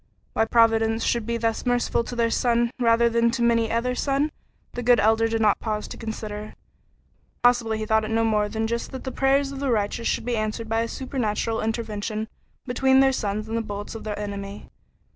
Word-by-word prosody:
Why 220 - +2
Providence 225 -1 +3
should 235 -2 0
be 235 0 0
thus 225 -1 -1
merciful 245 -1 +1
to 245 - -6
their 230 -1 +1
son 235 -1 +2
rather 235 -1 +4
than 235 0 +2
to 235 0 -1
many 230 -1 +3
another 235 +3 0
son, 280 +3 0 0.4
the 245 - -4
good 245 -1 +4
Elder 220 +2 +3
did 225 0 -1
not 210 -2 +3
pause 215 -2 -3
to - - -7
consider. 215 -2 -6 0.9
Possibly 240 -3 +3
he 215 - -3
thought 220 0 +2
it - - -5
no 225 0 +1
more 210 -2 +1
than 220 +1 -2
just 235 +1 -2
that 260 - -6
the 260 - -4
prayers 275 +1 +2
of 275 - -6
the 280 -1 -1
righteous 220 0 0
should - - -1
be 245 -1 0
answered 215 +1 -2
by 225 +1 +1
a 230 - -1
supernatural 230 -3 -2
intervention 220 -1 -3 0.4
between 265 +1 +3
their 270 0 +5
sons 210 -2 -2
and 225 - -3
the 230 - +1
bullets 205 -1 -6
of 225 - -7
the 210 -1 -4
enemy. 200 -1 -6
225 Hz, 210 wpm, -24 LUFS, 215-240 Hz, 0.9 s, their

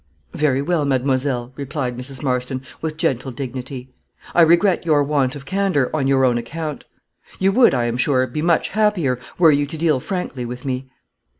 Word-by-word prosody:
"Very 140 -2 +1
well, 170 0 +1
mademoiselle," 130 -2 0
replied 140 -3 -3
Mrs. 130 +2 -5
Marston, 130 0 -2 0.2
with 155 -1 -4
gentle 130 -3 -1
dignity; 130 0 -7 0.4
"I 175 - +5
regret 170 +3 +4
your 150 -4 +3
want 140 -2 0
of 140 -1 -9
candor, 185 -6 0
on 140 -3 0
your 135 -1 +3
own 120 -2 +2
account. 150 +5 -6 0.5
You 190 +1 +2
would, 235 - +5
I 120 -2 +1
am 120 0 -1
sure, 130 0 +2
be 130 +5 -4
much 170 0 +2
happier, 190 - +1 0.2
were 165 -3 +6
you 145 0 +1
to 160 +2 -6
deal 155 -4 +2
frankly 165 -5 -4
with 125 +2 -7
me." 130 0 -3
140 Hz, 180 wpm, -20 LUFS, 130-160 Hz, 0.5 s, were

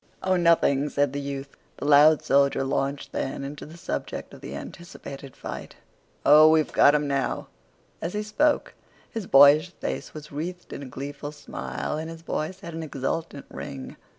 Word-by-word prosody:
"Oh, 185 0 +2
nothing," 165 -5 +3
said 145 -2 +1
the 145 - -3
youth. 140 0 -6 0.2
The - - -5
loud 150 +1 +6
soldier 140 0 +3
launched 135 +1 -2
then 135 +1 -3
into 145 +2 -7
the 160 +3 -12
subject 180 - -5
of - - -12
the - - -7
anticipated 140 -6 -9
fight. - - -7 0.5
"Oh, 155 +2 +8
we've 155 -1 +3
got 145 - +6
'em 150 -1 +1
now!" 140 -1 -1 0.5
As 170 - -3
he 210 0 -2
spoke 290 +8 +1 0.4
his 225 -5 -5
boyish 145 +5 +7
face - - -5
was 155 -1 -10
wreathed 175 +5 -6
in - - -6
a 140 - -7
gleeful 145 +3 -6
smile, 150 0 -5
and 160 +1 -5
his 165 0 -10
voice 170 +4 -3
had 170 -4 -8
an 165 - -5
exultant 145 0 -4
ring. 135 -2 -7
150 Hz, 175 wpm, -26 LUFS, 140-165 Hz, 0.5 s, Oh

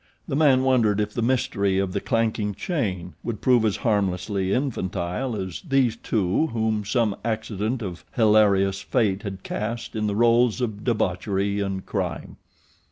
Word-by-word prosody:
The - - -2
man 140 -4 +4
wondered 115 -6 +3
if 105 0 -1
the 120 - -2
mystery 100 -6 +1
of 95 -1 0
the - - -1
clanking 110 -3 0
chain 95 - -3
would 115 -4 -4
prove 125 -3 +3
as 110 -3 +1
harmlessly 100 -2 0
infantile 110 -2 -2
as 95 -4 -5
these 135 -7 +2
two 110 - 0
whom 110 -4 -1
some 105 0 +1
accident 110 +1 -2
of 90 -3 -6
hilarious 100 -3 +4
fate 105 -6 0
had 95 -2 -6
cast 115 +3 -4
in 105 -1 0
the 100 - -1
roles 120 +1 +3
of 110 -4 -3
debauchery 100 -2 0
and 95 -1 -3
crime. - - -4
105 Hz, 155 wpm, -24 LUFS, 100-120 Hz, -, man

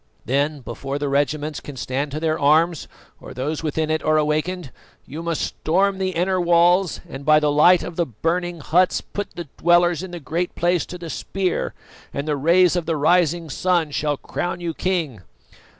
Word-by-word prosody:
Then, 140 +3 0
before 135 +3 -5
the 145 -1 -2
regiments 145 +1 -1
can 145 -2 -10
stand 135 +4 -2
to 150 +2 -4
their 155 -1 0
arms 160 +3 +3 0.3
or - - -11
those 145 +5 -3
within 155 0 -1
it 155 - 0
are 155 0 +2
awakened, 155 +1 -1 0.3
you 155 +4 -7
must 170 -1 -2
storm 190 +4 0
the 190 -1 0
inner 185 +2 +1
walls 175 +1 +3
and 135 -3 -8
by 155 +1 +5
the 150 -1 +1
light 170 +5 +5
of 170 - -7
the 170 - +2
burning 170 - -2
huts, 180 +6 +2
put 205 - -6
the 170 -2 -6
dwellers 175 0 +3
in 190 - -6
the 175 0 -7
Great 165 +5 -3
Place 175 -1 +1
to 180 - -7
the 170 -2 -7
spear, 190 -2 -2 0.4
and 140 +2 -4
the 150 - +1
rays 170 +5 +4
of 175 -3 -2
the 165 -2 0
rising 170 +2 +2
sun 170 +1 0
shall 145 0 -1
crown 175 +5 -4
you 170 -2 -3
king. 160 - -2
165 Hz, 190 wpm, -22 LUFS, 150-175 Hz, 0.4 s, by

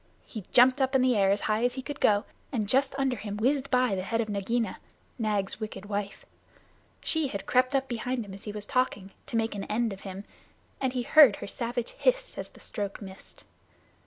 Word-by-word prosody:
He 215 -6 -8
jumped 255 +2 +6
up 265 +1 +1
in 260 - +5
the 255 -2 +3
air 195 -2 +4
as 200 +1 +2
high 215 +2 0
as 245 0 +1
he 260 - -5
could 290 0 -6
go, 205 +1 +3 0.3
and 220 -6 -1
just 270 +4 +2
under 270 -2 +1
him 210 -1 -5
whizzed 270 +5 +1
by 250 -4 +3
the 185 - -1
head 225 +4 -1
of 220 -2 -1
Nagaina, 220 +3 -1 0.4
Nag's 210 -3 -1
wicked 215 -2 -6
wife. 205 -1 -4 0.8
She 320 -3 0
had 200 -6 -5
crept 255 +2 +2
up 270 0 +1
behind 240 0 -2
him 195 - -10
as 195 - -11
he 210 - -4
was 210 -1 -6
talking, 230 -7 -1 0.2
to 230 - -1
make 225 0 0
an 200 -1 -5
end 225 0 0
of 195 - -11
him. 195 0 -7 0.6
He 255 -2 0
heard 280 -6 +7
her - - -7
savage 235 +3 -3
hiss - - 0
as - - -5
the - - -18
stroke 200 -3 -5
missed. 190 -2 -12
230 Hz, 215 wpm, -28 LUFS, 205-255 Hz, 0.8 s, heard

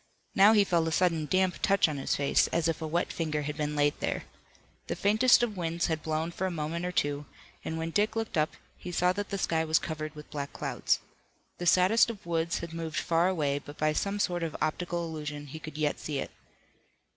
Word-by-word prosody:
Now 200 +3 +7
he 210 -2 +6
felt 170 -4 +1
a - - -1
sudden 165 -3 +1
damp 185 +2 +1
touch 195 -2 +4
on 150 -2 -3
his 135 - 0
face, 140 0 +3
as 165 -1 0
if 165 -1 -1
a 160 - -2
wet 170 +3 -1
finger 150 -3 -1
had 150 +1 -3
been 150 0 -2
laid 145 0 +3
there. - - -2 0.6
The - - -2
faintest 220 +5 +5
of 220 -3 -1
winds 170 -1 -1
had 160 -1 -1
blown 160 +2 -2
for 190 +2 -2
a - - -1
moment 170 +1 -3
or - - -2
two, 145 -3 -1 0.4
and 160 - -3
when 165 +1 -3
Dick 210 +5 +1
looked 225 -2 -2
up, 155 -1 +1 0.2
he 180 - -6
saw 180 +1 +2
that 205 +1 -4
the 200 - -2
sky 160 -3 +1
was 160 0 +3
covered 155 -2 -4
with 150 0 -11
black 140 -1 -4
clouds. - - 0 0.6
The 175 - -2
saddest 185 +8 +5
of 215 -6 -7
woods 170 0 0
had 170 -1 -6
moved 165 -1 -4
far 165 +1 +2
away, 145 -6 0
but 145 +1 -12
by 155 0 +2
some 200 +6 -1
sort 175 -3 0
of 165 -2 -3
optical 170 +2 -1
illusion 150 -2 -5
he 145 +3 -8
could 155 -1 -8
yet 150 -1 0
see 150 -2 -3
it. - - -4
165 Hz, 225 wpm, -29 LUFS, 155-180 Hz, 0.6 s, Now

